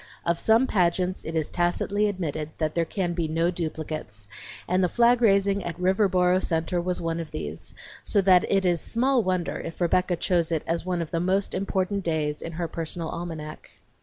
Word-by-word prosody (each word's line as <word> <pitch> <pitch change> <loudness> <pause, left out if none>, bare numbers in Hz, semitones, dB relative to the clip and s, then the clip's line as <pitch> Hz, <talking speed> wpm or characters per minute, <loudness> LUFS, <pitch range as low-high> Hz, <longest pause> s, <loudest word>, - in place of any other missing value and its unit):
Of 170 0 +1
some 225 +4 +4
pageants 185 -3 +1
it 160 - -4
is 155 -2 -1
tacitly 195 +4 +1
admitted 155 -6 -3
that 155 -1 -1
there 170 -1 +1
can 175 -1 -2
be 170 -2 -1
no 165 +3 +1
duplicates, 155 - -5 0.4
and 185 +1 +2
the 180 - +2
flag 240 +3 +4
raising 200 -2 +3
at 170 -1 -5
Riverboro 185 -1 +3
Centre 170 +1 0
was 180 +1 -1
one 165 0 -2
of 165 -2 -5
these; 75 +2 -6 0.3
so 205 - +1
that 185 -2 +5
it 195 -1 +2
is 175 -2 +2
small 255 +2 +2
wonder 185 -3 -1
if 165 - -7
Rebecca 180 +1 +2
chose 170 -1 +1
it 160 -2 0
as 170 +2 -2
one 175 -2 0
of 160 - -10
the 185 +4 +1
important 195 0 -1
dates 155 -3 -1
in 165 - -6
her 170 +1 -3
personal 165 0 -4
almanac. 160 -3 -7
175 Hz, 190 wpm, -26 LUFS, 165-190 Hz, 0.4 s, that